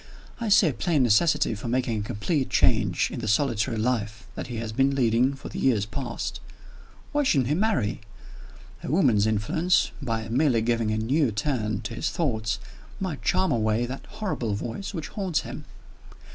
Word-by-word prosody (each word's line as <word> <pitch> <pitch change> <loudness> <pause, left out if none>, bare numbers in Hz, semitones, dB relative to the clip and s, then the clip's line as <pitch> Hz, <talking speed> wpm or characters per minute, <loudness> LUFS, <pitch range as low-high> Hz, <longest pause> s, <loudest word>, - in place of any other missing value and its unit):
I 230 -2 -2
see 205 0 +6
a 150 - 0
plain 160 -5 +1
necessity 135 +4 +3
for 110 +3 -6
making 120 -2 0
a - - -2
complete 130 - -1
change - - +2
in - - -5
the 115 - -4
solitary 110 -1 +1
life 110 0 -1
that - - -6
he 120 - -6
has 115 -1 -4
been 135 +4 +2
leading 125 +1 +2
for 135 - -9
years 115 -7 +2
past. 120 +1 -4 0.7
Why 295 - +2
shouldn't 135 - +2
he - - +2
marry? 170 - 0 0.8
A - - -4
woman's 125 - +3
influence, 115 - +1
by 115 -4 -2
merely 120 -1 +2
giving 115 -1 +1
a 110 - 0
new 130 +4 +1
turn 110 -3 -1
to 120 - -5
his 115 - -1
thoughts, 110 -10 -1 0.4
might 180 -7 -3
charm 190 -3 +2
away 110 -1 +1
that 130 +3 -7
horrible 125 - -3
voice 115 - -5
which 160 -7 -5
haunts 185 -7 -1
him. - - -8
125 Hz, 175 wpm, -26 LUFS, 110-150 Hz, 0.8 s, see